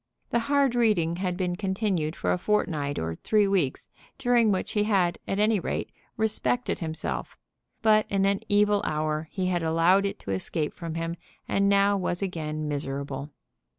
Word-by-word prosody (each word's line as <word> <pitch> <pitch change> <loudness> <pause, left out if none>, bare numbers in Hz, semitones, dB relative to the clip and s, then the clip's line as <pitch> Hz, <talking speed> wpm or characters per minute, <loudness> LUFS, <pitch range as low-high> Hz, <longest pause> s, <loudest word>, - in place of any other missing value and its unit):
The 235 - +3
hard 280 -3 +3
reading 205 -9 +2
had 180 -1 -2
been 180 -2 -1
continued 190 -5 -1
for - - -1
a - - -1
fortnight 155 -8 0
or 80 0 -3
three 210 -2 +2
weeks, 180 -9 0 0.3
during 245 -4 +3
which 185 - -1
he 210 -1 +1
had, 185 -5 +2
at 195 - -1
any 210 0 +3
rate, - - -3 0.3
respected 220 +3 0
himself, 160 -2 -4 0.5
but 215 -1 +4
in 195 -1 +2
an 200 0 +2
evil 205 0 +3
hour 155 0 -1
he 190 -2 -2
had 180 -1 0
allowed 165 +5 +3
it - - -5
to 100 - -5
escape 150 - -2
from 165 -2 -6
him, 165 +1 -3 0.3
and 200 0 +2
now 200 0 +4
was 180 0 -1
again 155 -4 -3
miserable. 140 -1 -4
185 Hz, 170 wpm, -27 LUFS, 160-205 Hz, 0.5 s, but